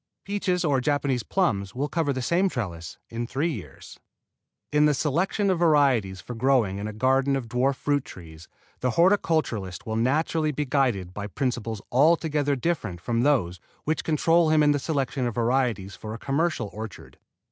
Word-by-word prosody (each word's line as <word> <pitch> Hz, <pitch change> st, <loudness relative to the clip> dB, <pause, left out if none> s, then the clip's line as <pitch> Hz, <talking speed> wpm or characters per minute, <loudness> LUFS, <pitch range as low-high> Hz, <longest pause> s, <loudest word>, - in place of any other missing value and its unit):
Peaches 195 Hz, -3 st, -1 dB
or 140 Hz, -4 st, +2 dB
Japanese 140 Hz, -2 st, 0 dB
plums 100 Hz, -, -1 dB
will 140 Hz, +3 st, -1 dB
cover 160 Hz, -2 st, 0 dB
the 130 Hz, -2 st, -3 dB
same 180 Hz, +8 st, +2 dB
trellis 85 Hz, -, -5 dB
in 115 Hz, +1 st, -3 dB
three 145 Hz, +7 st, -1 dB
years. -, -, -9 dB, 0.7 s
In 150 Hz, 0 st, +4 dB
the 150 Hz, -, +2 dB
selection 180 Hz, +8 st, 0 dB
of 180 Hz, -, 0 dB
varieties 135 Hz, -, +3 dB
for 120 Hz, -, -7 dB
growing 115 Hz, -5 st, +1 dB
in 105 Hz, -, -4 dB
a -, -, -4 dB
garden 130 Hz, +5 st, +2 dB
of 130 Hz, -4 st, -3 dB
dwarf 130 Hz, +4 st, +1 dB
fruit 145 Hz, 0 st, 0 dB
trees 80 Hz, -2 st, -12 dB, 0.3 s
the 125 Hz, -, 0 dB
horticulturist 155 Hz, -, +1 dB
will 110 Hz, 0 st, -2 dB
naturally 155 Hz, +5 st, +1 dB
be 150 Hz, +1 st, -2 dB
guided 125 Hz, -10 st, 0 dB
by 100 Hz, +1 st, -5 dB
principles 115 Hz, 0 st, -3 dB
altogether 150 Hz, 0 st, +3 dB
different 125 Hz, -, -2 dB
from 115 Hz, +5 st, -1 dB
those 100 Hz, -, +1 dB, 0.2 s
which 155 Hz, +1 st, -1 dB
control 165 Hz, +1 st, +3 dB
him 155 Hz, -1 st, +4 dB
in 145 Hz, -, +5 dB
the 145 Hz, -, +1 dB
selection 135 Hz, -3 st, -1 dB
of 120 Hz, -, -4 dB
varieties 120 Hz, -5 st, 0 dB
for 110 Hz, 0 st, -7 dB
a -, -, -6 dB
commercial 145 Hz, -4 st, -1 dB
orchard. 110 Hz, -2 st, -9 dB
135 Hz, 170 wpm, -25 LUFS, 110-155 Hz, 0.7 s, in